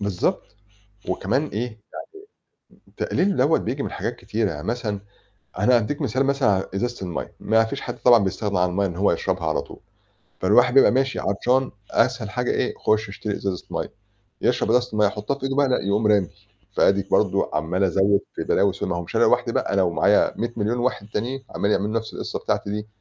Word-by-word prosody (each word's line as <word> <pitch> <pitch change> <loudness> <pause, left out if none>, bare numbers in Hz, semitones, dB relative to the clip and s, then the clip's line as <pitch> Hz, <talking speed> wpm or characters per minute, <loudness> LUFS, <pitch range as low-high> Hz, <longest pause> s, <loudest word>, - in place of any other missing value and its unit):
بالضبط، 100 -3 -1 0.7
وكمان 100 +10 0
إيه، 110 -5 -3 1.0
يعني - - -26 0.2
تقليله 195 +1 0
دوّة 145 +5 +3
بييجي - - -3
من - - -4
حاجات - - -3
كتيرة، 110 -2 -2
يعني 75 +3 -7
مثلًا 110 -4 -2 0.6
أنا 120 +6 +4
هاديك 130 +7 -1
مثال 135 -1 0
مثلًا 140 -3 +2
على 95 -2 +1
إزازة 110 -1 -3
المَيّة، 85 - -5
ما 110 +1 +3
فيش 135 +5 -5
حد 120 - -6
طبعًا 120 -4 +5
بيستغنى 100 0 -1
عن 90 0 +3
المَيّة 100 +3 0
إن 85 -3 -5
هو 100 +2 +3
يشربها 95 -3 -2
على 80 - +1
طول. - - -13 0.6
فالواحد 120 +6 +4
بيبقى 135 - +6
ماشي 130 +1 0
عطشان 125 +6 +1 0.2
أسهل - - +1
حاجة - - -1
إيه؟ - - 0
خُشّ 110 -1 +1
اشتري 105 +1 -4
إزازة 95 -2 -4
مَيّة، - - -3 0.5
يشرب - - +1
إزازة 125 0 +3
المَيّة 105 -1 +3
يحطها 105 +6 -3
في - - -12
إيده 135 0 -1
بقى؟ 145 -1 +3
لأ، 125 - +1
يقوم 105 +2 +1
رامي، 100 -4 +3 0.5
فأديك 100 0 +3
برضه 100 -2 +2
عمال 80 +5 0
أزوّد 95 +2 +3 0.2
في - - -3
بلاوي 100 -1 +2
سودة، - - -4
ما 85 - -1
هو - - -2
مش 85 - -9
أنا - - +4
لوحدي - - +3
بقى، - - -1
أنا 100 -1 +3
ومعايا 85 -2 +3
100 120 0 -2
مليون 110 +3 0
واحد 120 -4 -1
تانيين، 130 +5 -3
عمالين 100 - -1
يعملوا 105 +3 -2
نفس 110 - -10
القصة - - -4
بتاعتي - - -2
دي. 105 +1 -4
105 Hz, 200 wpm, -23 LUFS, 95-125 Hz, 1.0 s, بيبقى